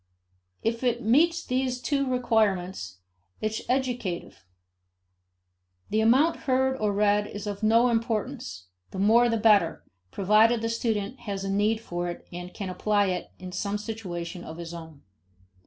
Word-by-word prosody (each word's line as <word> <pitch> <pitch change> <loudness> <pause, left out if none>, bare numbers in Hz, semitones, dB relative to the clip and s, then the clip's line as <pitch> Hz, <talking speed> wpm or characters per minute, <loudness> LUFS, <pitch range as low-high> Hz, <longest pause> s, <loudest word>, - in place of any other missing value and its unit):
If 230 +2 -1
it 240 -1 +1
meets 330 +10 +3
these 255 0 -1
two 275 0 0
requirements, 190 - 0 0.4
it 215 0 -2
is - - -10
educative. 245 - -2 1.5
The 215 +1 +2
amount 265 +9 +4
heard 265 0 +2
or 210 -3 0
read 205 0 +2
is 205 0 -7
of 205 0 -4
no 225 +3 +4
importance 230 - -2 0.2
the - - -8
more 225 +5 +5
the 230 - +1
better, 210 -6 +3 0.3
provided 215 - +3
the 230 - 0
student 230 0 -2
has 195 -1 -3
a 195 - -2
need 210 +3 +2
for 175 -4 -4
it 175 - -8
and 175 +1 -7
can 195 -2 -5
apply 205 +1 +1
it 180 - -3
in 185 -1 -8
some 200 +2 -2
situation 185 -6 -6
of 160 - -8
his 170 0 -7
own. 160 -4 -10
215 Hz, 155 wpm, -27 LUFS, 190-240 Hz, 1.5 s, more